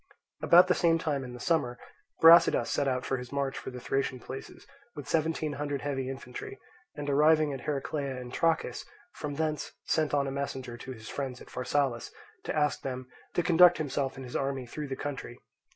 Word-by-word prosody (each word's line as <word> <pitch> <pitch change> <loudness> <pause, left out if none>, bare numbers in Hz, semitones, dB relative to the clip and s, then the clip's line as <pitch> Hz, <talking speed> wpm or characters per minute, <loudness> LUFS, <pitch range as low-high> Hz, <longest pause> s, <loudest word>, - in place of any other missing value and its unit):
About 175 +2 +7
the 180 - +3
same 165 -2 +3
time 150 -4 -1
in 125 -1 -8
the 125 - -9
summer, 125 -5 0 0.5
Brasidas 165 +1 +7
set 140 - +1
out 130 0 -1
on 135 - +1
his 125 -1 -9
march 140 -1 -1
for - - -6
the 125 - -8
Thracian 130 +1 -1
places 130 +2 -9 0.3
with 145 -1 -8
seventeen 160 -1 0
hundred 145 -1 -3
heavy 135 -2 -2
infantry, 405 - -7 0.4
and 145 - -5
arriving 150 +1 +4
at 135 - -6
Heraclea 140 -2 -2
in 125 -1 -8
Trachis, 165 +2 0 0.3
from 145 -1 -5
thence 155 0 -2
sent 155 -2 +1
on 140 -1 +2
a 135 - -3
messenger 135 -3 -4
to 130 +2 -8
his 110 -2 -11
friends 130 -3 -4
at - - -14
Pharsalus, 125 -2 -1 0.4
to - - -2
ask 150 -1 +1
them 130 -1 -5 0.3
to 175 - +2
conduct 175 +1 +7
himself 140 -2 -2
and 130 - -8
his 125 - -9
army 135 -2 -1
through 150 +5 -6
the 135 - -3
country. 135 -4 -6
140 Hz, 195 wpm, -29 LUFS, 130-155 Hz, 0.5 s, About